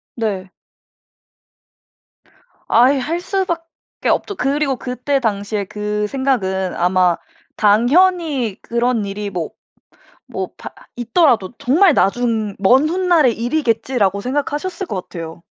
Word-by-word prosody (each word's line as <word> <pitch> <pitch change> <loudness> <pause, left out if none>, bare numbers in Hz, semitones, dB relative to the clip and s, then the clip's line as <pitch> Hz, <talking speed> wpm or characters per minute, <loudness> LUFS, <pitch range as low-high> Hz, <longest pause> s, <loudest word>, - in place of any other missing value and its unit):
네. 200 -5 -3 2.2
아이 260 +4 +5
할 330 +7 -2
수밖에 340 -4 -4
없죠. 405 - 0
그리고 275 -1 0
그때 250 +3 -2
당시에 205 -1 -1
그 210 +1 -3
생각은 200 -8 -1
아마 180 0 +2 0.4
당연히 260 - +2
그런 235 -2 0
일이 200 +1 -4
뭐 175 -4 -4 0.8
뭐 - - -3
바 - - -8 0.3
있더라도 240 - +2
정말 320 +5 +4
나중 220 -1 +1
'먼 260 +9 +4
훗날의 340 -8 +3
일이겠지.'라고 230 -5 0
생각하셨을 295 - -3
것 185 - -5
같아요. 165 -1 -8
240 Hz, 230 characters per minute, -18 LUFS, 205-295 Hz, 2.2 s, 아이